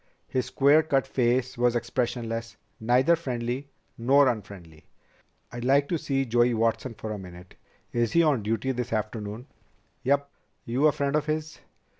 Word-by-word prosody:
His 130 -1 -1
square 140 +3 +4
cut 140 -4 +1
face 125 0 0
was 120 0 +3
expressionless, 115 -1 -2 0.2
neither 125 +8 +3
friendly 130 -3 -4 0.3
nor 135 +4 +5
unfriendly. 100 -9 -7 0.6
"I'd 120 0 -6
like 140 +2 +3
to 170 - 0
see 135 -1 -1
Joey 120 0 +2
Watson 115 +2 0
for 110 +1 -6
a 105 - -6
minute. 90 -1 -12 0.4
Is 120 -1 0
he 170 - +5
on 145 -7 +2
duty 115 +5 -1
this 125 -2 -3
afternoon?" 110 +1 -4 0.6
"Yep. 140 +1 +1 0.4
You 130 +6 +2
a - - +5
friend 140 0 -1
of 150 0 0
his?" 155 0 -3
125 Hz, 155 wpm, -26 LUFS, 115-140 Hz, 0.6 s, nor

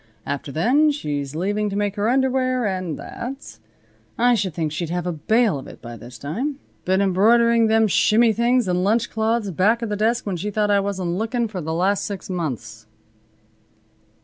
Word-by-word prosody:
After 140 +1 -4
then 255 - +3
she's 145 - -3
leaving 205 +5 -1
to 200 - -4
make 205 -1 -1
her 210 +1 0
underwear, 255 -1 +1
and 185 -6 -2
that. 265 +3 -8 0.6
I 245 +1 +4
should 190 -7 -1
think 160 -2 -2
she'd 155 +2 -3
have 175 0 -2
a 180 - -1
bale 210 - +1
of - - -10
it - - -12
by 120 -1 -9
this 120 +1 -11
time. 235 - -3 0.3
Been 190 +1 +2
embroidering 230 +4 +4
them 220 0 +4
shimmy 220 +3 +4
things 240 0 +2
and 180 0 +1
lunch 225 +4 +1
cloths 220 -2 0
back 215 +7 +2
of 230 - -2
the 210 - -1
desk 225 +3 0
when 195 -4 -2
she 200 +5 -3
thought 210 0 0
I 200 - +4
wasn't 195 -3 -2
lookin' 230 +1 -1
for 195 -4 -6
the 160 0 -4
last 190 +5 +1
six 195 -2 -5
months." 115 -10 -5
205 Hz, 190 wpm, -22 LUFS, 175-235 Hz, 0.6 s, I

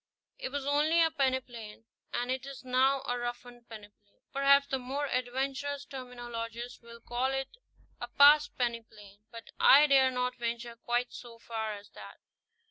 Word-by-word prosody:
It - - -4
was 280 0 -4
only 300 +4 +2
a 325 -1 +4
pene 265 -4 +1
plain, 225 -3 -11 0.3
and 245 +1 -2
it 260 0 -2
is 275 -2 -9
now 260 +2 +2
a 245 0 -2
roughened 240 0 -7
peneplain. 205 -2 -14
Perhaps 280 0 +4
the 265 - -1
more 270 +3 -3
adventurous 270 +3 -2
terminologist 240 -2 -7
will 235 0 -13
call 245 +3 -1
it 270 0 -2 0.5
a - - -5
past 290 +1 +5
peneplain; 225 -4 -4
but 230 -1 -11
I 290 +2 +8
dare 270 -2 +5
not 250 0 -2
venture 235 0 -4
quite 240 +1 -2
so 235 -2 -10
far 220 -2 -4
as 205 0 -12
that. - - -12
250 Hz, 160 wpm, -30 LUFS, 235-275 Hz, 0.5 s, I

